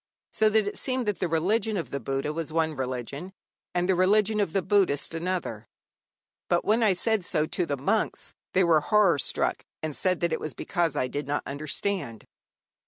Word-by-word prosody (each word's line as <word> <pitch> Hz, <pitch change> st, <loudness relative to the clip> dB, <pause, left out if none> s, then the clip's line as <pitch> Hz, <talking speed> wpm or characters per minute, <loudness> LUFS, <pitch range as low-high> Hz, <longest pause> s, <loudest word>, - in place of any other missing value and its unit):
So 220 Hz, -, +3 dB
that 215 Hz, -1 st, +3 dB
it 205 Hz, -, -4 dB
seemed 255 Hz, -2 st, -1 dB
that 205 Hz, -4 st, -1 dB
the 180 Hz, -, 0 dB
religion 205 Hz, +7 st, +1 dB
of 170 Hz, -, -4 dB
the 140 Hz, -, -2 dB
Buddha 135 Hz, +4 st, -2 dB
was 165 Hz, -1 st, -4 dB
one 160 Hz, -1 st, 0 dB
religion, 130 Hz, +7 st, -4 dB, 0.4 s
and 175 Hz, 0 st, +1 dB
the 190 Hz, -, +4 dB
religion 210 Hz, +4 st, +3 dB
of 200 Hz, -5 st, +1 dB
the 195 Hz, +1 st, 0 dB
Buddhists 185 Hz, -6 st, +2 dB
another; 165 Hz, -, -3 dB, 0.8 s
but 175 Hz, -, +2 dB
when 220 Hz, +3 st, +3 dB
I 215 Hz, -4 st, +4 dB
said 215 Hz, +2 st, +1 dB
so 155 Hz, -2 st, +1 dB
to 175 Hz, +1 st, -2 dB
the 140 Hz, -, -1 dB
monks, 210 Hz, +11 st, -1 dB, 0.2 s
they 190 Hz, -, +4 dB
were 165 Hz, -3 st, +4 dB
horror 195 Hz, -4 st, +4 dB
struck, -, -, -1 dB, 0.2 s
and 155 Hz, -2 st, -3 dB
said 185 Hz, -2 st, +1 dB
that 170 Hz, -1 st, +1 dB
it -, -, -1 dB
was 155 Hz, -, -6 dB
because 170 Hz, -5 st, -1 dB
I 130 Hz, -, 0 dB
did 145 Hz, +2 st, -4 dB
not 145 Hz, +1 st, -1 dB
understand. 145 Hz, -, -2 dB
175 Hz, 195 wpm, -27 LUFS, 150-200 Hz, 0.8 s, the